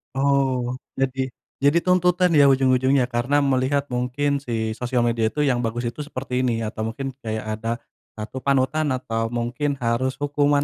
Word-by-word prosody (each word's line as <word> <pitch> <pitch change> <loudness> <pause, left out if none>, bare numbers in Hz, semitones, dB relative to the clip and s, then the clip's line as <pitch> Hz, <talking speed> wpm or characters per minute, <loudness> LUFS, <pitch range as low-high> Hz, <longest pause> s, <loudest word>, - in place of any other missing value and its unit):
Oh 135 -2 +1 0.2
jadi 130 0 -1 0.3
jadi 145 +4 +4
tuntutan 180 0 +3
ya 145 -2 +6
ujung-ujungnya 130 0 +3
karena 120 +4 +1 0.2
melihat 130 +2 +1
mungkin 135 +3 0
si 115 -4 -2
sosial 125 -1 0
media 115 -1 +1
itu, 150 +5 -1
yang 125 -2 +1
bagus 120 +2 -2
itu 120 - -16
seperti 130 -3 -6
ini, 125 -2 +1
atau 110 0 -5
mungkin 135 +4 -4
kayak 110 -1 -4
ada 115 +1 -2 0.5
satu 110 +5 -5
panutan, 140 +3 +1
atau 115 -3 -2
mungkin 120 +5 -2
harus 120 +3 0
hukuman 145 0 +1
130 Hz, 160 wpm, -23 LUFS, 120-140 Hz, 0.5 s, ya